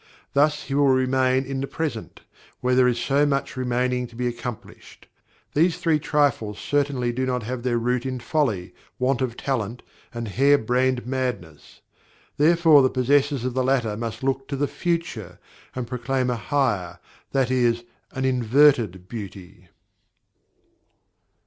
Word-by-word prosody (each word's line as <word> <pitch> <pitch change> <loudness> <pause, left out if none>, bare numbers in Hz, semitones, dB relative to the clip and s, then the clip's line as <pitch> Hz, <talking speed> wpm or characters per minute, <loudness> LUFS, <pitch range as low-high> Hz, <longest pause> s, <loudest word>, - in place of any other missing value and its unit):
Thus 150 +2 +2
he 135 - -6
will 140 0 +3
remain 130 0 +2
in 135 0 -4
the 135 - -3
present, 150 -9 -5 0.4
where 125 0 0
there 125 0 +5
is 120 -1 +1
so 140 +1 +2
much 140 -1 0
remaining 125 0 -1
to 115 - -17
be 125 +1 -2
accomplished. 120 -1 -7 0.5
These 165 +3 +2
three 160 -3 +1
trifles 140 -9 0
certainly 140 -4 0
do 130 +2 -2
not 125 -2 -1
have 125 +2 -4
their 120 -1 0
root 120 +1 0
in 130 -1 -3
folly, 120 - -1 0.2
want 130 +1 0
of 125 -2 -2
talent, 120 -3 -3 0.3
and 120 -1 -5
hare 140 +7 +4
brained 125 +1 0
madness; 125 - -4 0.6
therefore 160 -1 +6
the 130 - +3
possessors 135 +1 +1
of 130 - -2
the 130 +1 0
latter 125 -5 +1
must 115 +1 -5
look 135 0 -1
to 140 - -3
the 145 +1 0
"future," 135 - -3 0.4
and 130 -1 -3
proclaim 125 +1 -1
a - - 0
"higher," 115 -9 -1 0.3
that 130 -2 +1
is, 120 -2 +2 0.3
an 130 0 -3
"inverted 125 -6 +3
beauty." 95 -4 -9
130 Hz, 150 wpm, -24 LUFS, 120-140 Hz, 0.6 s, therefore